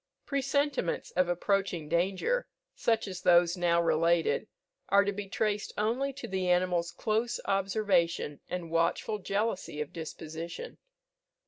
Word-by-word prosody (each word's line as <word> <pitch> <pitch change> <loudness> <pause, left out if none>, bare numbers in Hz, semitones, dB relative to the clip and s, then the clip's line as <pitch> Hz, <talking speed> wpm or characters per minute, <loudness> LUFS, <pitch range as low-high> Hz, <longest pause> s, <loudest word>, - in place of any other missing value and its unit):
Presentiments 280 - 0
of 185 -1 +2
approaching 180 -2 0
danger, 190 - +1 0.3
such 225 -2 +1
as 185 -1 -6
those 175 0 +5
now 175 -1 +2
related, 170 0 +2 0.4
are 200 0 +6
to 200 - 0
be 200 0 -6
traced 210 0 -1
only 240 +7 0
to 275 +1 -8
the 190 -1 -1
animal's 180 -1 +2
close 225 +2 -1
observation 190 -6 +1
and 175 -2 -4
watchful 170 +6 +1
jealousy 200 -5 -2
of 150 -1 -4
disposition. 165 - -7
185 Hz, 125 wpm, -30 LUFS, 170-215 Hz, 0.4 s, are